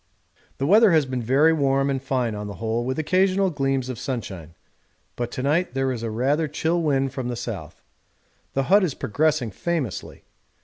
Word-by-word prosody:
The 135 - -1
weather 210 +3 +6
has 155 -3 +4
been 130 -1 -3
very 140 +8 +4
warm 135 -2 +2
and 135 -1 -2
fine 130 -4 -1
on 105 0 -5
the 100 - -7
whole, 115 +2 -2
with 130 +1 -2
occasional 185 +4 +2
gleams 135 -3 -1
of 130 -3 -5
sunshine, 95 - -5 0.6
but 120 -1 -3
to 130 - -4
night 150 0 +1
there 135 0 +1
is 120 -3 -4
a 115 - -3
rather 140 +8 +1
chill 160 +4 0
wind 135 -4 +1
from 130 -3 -4
the 125 - -3
south. 115 -4 -7 0.7
The 135 - +2
hut 200 +8 +4
is 160 -7 -1
progressing 145 -1 0
famously. 150 - -4
135 Hz, 185 wpm, -24 LUFS, 120-155 Hz, 0.7 s, weather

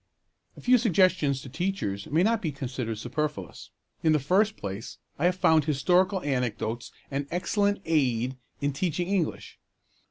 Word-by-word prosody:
A - - -10
few 250 0 +5
suggestions 185 - +3
to 130 - -9
teachers 150 - -2
may 160 +4 +2
not 225 +1 +2
be 160 - -1
considered 125 -5 -4
superfluous. 125 - -4 0.3
In 160 -1 +4
the 155 - +3
first 200 +10 +2
place, 100 +3 -6 0.2
I 160 - +1
have 180 0 +3
found 160 -5 +4
historical 180 +6 +2
anecdotes 120 -4 -2 0.2
an 140 +1 -2
excellent 200 +3 0
aid 130 -5 +1 0.3
in 140 0 0
teaching 175 +3 -1
English. 190 -5 -2
150 Hz, 150 wpm, -27 LUFS, 130-185 Hz, 0.3 s, few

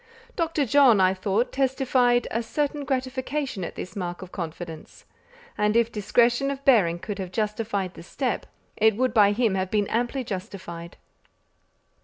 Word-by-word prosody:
Dr. 325 -4 0
John, 255 -4 +5
I 185 0 +4
thought, 195 +5 0
testified 255 -2 +2
a 230 - 0
certain 290 +4 -2
gratification 260 -3 -2
at - - -6
this 180 - -7
mark 175 -2 -4
of 185 - -11
confidence; 165 -2 -7 0.5
and 210 +1 +2
if 235 0 +2
discretion 240 +5 +2
of 275 0 -5
bearing 195 -11 +4
could 200 +3 -6
have 185 -2 -5
justified 210 -2 -2
the - - -11
step, 245 +8 -3 0.3
it 220 -1 +3
would 255 +3 0
by 205 -3 +6
him 220 -1 +1
have 190 -1 -1
been 205 0 +1
amply 245 +3 -1
justified. 185 -5 -7
220 Hz, 155 wpm, -25 LUFS, 190-255 Hz, 0.5 s, by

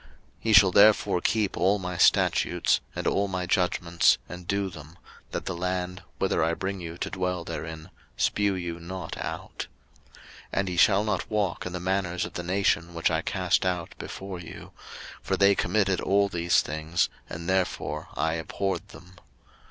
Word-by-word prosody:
03:020:022 - - -23 0.4
Ye 110 - +4
shall 95 -2 +8
therefore 100 -3 +5
keep 105 -3 +1
all 95 +3 +3
my 90 -2 -4
statutes, - - +3 0.2
and - - -4
all 100 0 +2
my 90 -1 -2
judgments, 90 -2 +2
and 90 0 -9
do 100 0 0
them: 85 -2 -11 0.3
that - - -4
the - - -2
land, 90 +1 -3 0.2
whither 95 -4 +1
I 85 +1 +1
bring 95 +1 -4
you 85 0 -7
to - - -4
dwell 90 -2 -2
therein, 80 -1 -7 0.3
spue 100 -1 +1
you 85 -1 -5
not 90 0 -6
out. - - -6 0.5
03:020:023 - - -20 0.4
And 95 -1 0
ye 90 - -4
shall 100 +3 +5
not 105 -4 -2
walk 100 -5 -1
in 90 - -6
the 90 - -3
manners 90 -1 -1
of - - -9
the - - -3
nation, 85 -2 0
which 85 0 +1
I 80 -1 +1
cast 95 0 +1
out 90 -3 -2
before 95 -2 -6
you: 85 - -10 0.5
for - - -1
they 100 0 +6
committed 95 -1 +1
all 100 +1 +2
these 85 -1 +2
things, 80 +3 0 0.2
and 85 +1 -6
therefore 95 -1 -1
I 80 +2 +1
abhorred 90 +3 -3
them. 90 -1 -15
90 Hz, 175 wpm, -27 LUFS, 85-95 Hz, 0.5 s, shall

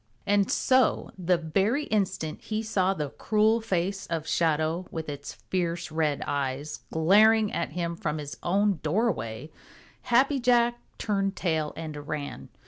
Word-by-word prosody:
And 200 -1 +2
so 260 -2 +2
the 180 -1 +1
very 195 - 0
instant 195 - -1
he 215 0 -3
saw 195 -3 +1
the 150 -5 -3
cruel 220 +1 +2
face 195 -1 -2
of 165 -2 -3
Shadow 160 +2 +1
with 160 -1 -5
its 145 -1 -6
fierce 175 -2 -3
red 155 -2 0
eyes 140 +1 -3
glaring 210 +6 +5
at 170 - -2
him 170 -1 -2
from 155 -2 -3
his 145 -1 -6
own 195 0 +1
doorway, 155 - -1 0.5
Happy 265 +3 +3
Jack 240 -1 +3 0.2
turned 195 -2 -1
tail 160 -4 -1
and 150 -2 -7
ran. 150 -2 -5
175 Hz, 140 wpm, -27 LUFS, 155-215 Hz, 0.5 s, glaring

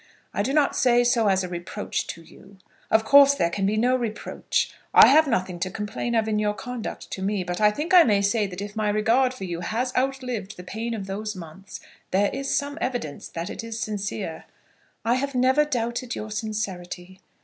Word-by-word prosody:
I - - 0
do 240 +6 -1
not 290 0 +2
say 245 -2 +4
so 240 -3 +2
as 190 -1 +2
a - - -3
reproach 175 -1 -4
to 165 - -7
you. 195 +4 -17 0.3
Of 220 0 +3
course 280 +1 +7
there 170 -9 +1
can 195 +2 0
be 215 +2 0
no 250 +3 +3
reproach. 230 -4 -2 0.2
I - - +11
have 310 +2 +6
nothing 185 -7 -1
to 185 - -1
complain 210 +4 -3
of 220 -1 +2
in 215 -1 0
your 210 -1 0
conduct 250 -2 -6
to 190 - -5
me. 195 0 -1
But 175 +2 -4
I 210 - +6
think 300 - -3
I 360 - +10
may 205 -9 +3
say 205 +1 +1
that 190 +1 -6
if 205 +1 -8
my 215 -1 0
regard 230 +5 +3
for 255 -6 -9
you 175 -2 -4
has 240 +7 -2
outlived 250 -6 -2
the 180 - -9
pain 225 +5 -4
of 200 -3 -5
those 210 +2 -4
months 185 +2 -10 0.3
there 200 +2 +2
is 275 0 -3
some 285 +2 -3
evidence 240 - -3
that 165 +1 -5
it - - -6
is 230 0 -5
sincere." 205 -5 -4 0.6
"I 230 - +3
have 280 +1 -3
never 260 +4 +4
doubted 240 -2 -2
your 215 0 -6
sincerity." 190 -4 -5
215 Hz, 210 wpm, -25 LUFS, 195-250 Hz, 0.6 s, I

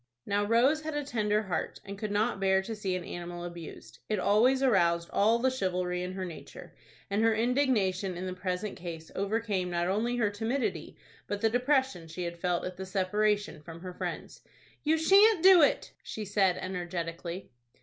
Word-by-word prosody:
Now 205 0 +1
Rose 245 +8 +3
had 310 -1 -4
a 295 - -1
tender 215 -5 0
heart, 180 -5 -3
and 200 0 -6
could 210 +1 -4
not 205 -1 0
bear 190 0 +3
to 225 +3 -5
see 195 -3 -2
an 180 - -4
animal 175 0 -6
abused. 170 -2 -9
It 215 - +1
always 240 +8 +3
aroused 170 -8 +2
all 220 +3 +4
the 260 +2 +1
chivalry 180 -6 -1
in 180 +1 -4
her 190 0 -4
nature, 170 -3 -10 0.4
and 205 +2 +1
her 225 0 +4
indignation 220 -7 +1
in 180 - -4
the 185 - -3
present 185 +2 -3
case 165 -2 -8
overcame 200 -2 -1
not 175 0 0
only 225 +6 0
her 215 -4 +1
timidity, 225 +6 -2 0.3
but 205 0 -3
the 225 -1 +3
depression 250 - +1
she 170 +3 -6
had 170 0 -5
felt 175 0 0
at 180 0 -6
the 190 - -5
separation 205 -1 0
from 165 +1 -10
her 180 0 -7
friends. - - -6 0.4
"You 315 +1 +3
shan't 390 +3 +5
do 375 -2 +9
it," 290 - +2
she 215 - -6
said, 195 -2 +2
energetically. 175 -1 -5
200 Hz, 185 wpm, -30 LUFS, 180-230 Hz, 0.4 s, do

